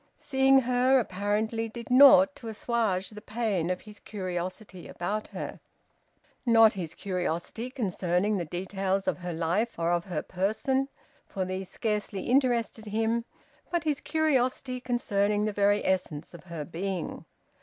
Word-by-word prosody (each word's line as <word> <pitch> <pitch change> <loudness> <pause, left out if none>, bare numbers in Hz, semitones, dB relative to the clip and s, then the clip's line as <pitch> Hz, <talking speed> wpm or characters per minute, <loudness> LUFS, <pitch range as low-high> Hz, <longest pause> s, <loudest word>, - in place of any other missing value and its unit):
Seeing 270 -1 +4
her 255 +2 +3
apparently 215 +2 -1
did 235 +2 -8
naught 280 +2 +8
to 230 - -9
assuage 220 -4 -1
the 210 0 -10
pain 215 -7 -1
of 180 0 -2
his 210 -1 -12
curiosity 185 -1 -5
about 210 +5 -3
her - - -6 0.8
not 225 -2 +6
his 170 -5 -5
curiosity 185 +5 -3
concerning 195 -4 0
the - - -1
details 190 +3 -2
of - - 0
her 180 0 -4
life 170 +8 -1
and 165 0 0
of 175 0 +1
her 180 - -3
person, 220 +9 0 0.4
for 190 -1 -3
these 185 0 -4
scarcely 210 -2 -2
interested 240 -4 +1
him, 225 +2 0 0.4
but 345 -3 0
his 300 -2 0
curiosity 260 -4 0
concerning 210 -4 +1
the 215 - -1
very 205 0 +2
essence 180 -5 -1
of 170 - -12
her 165 -4 -6
being. 180 +2 -4
210 Hz, 145 wpm, -28 LUFS, 185-240 Hz, 0.8 s, naught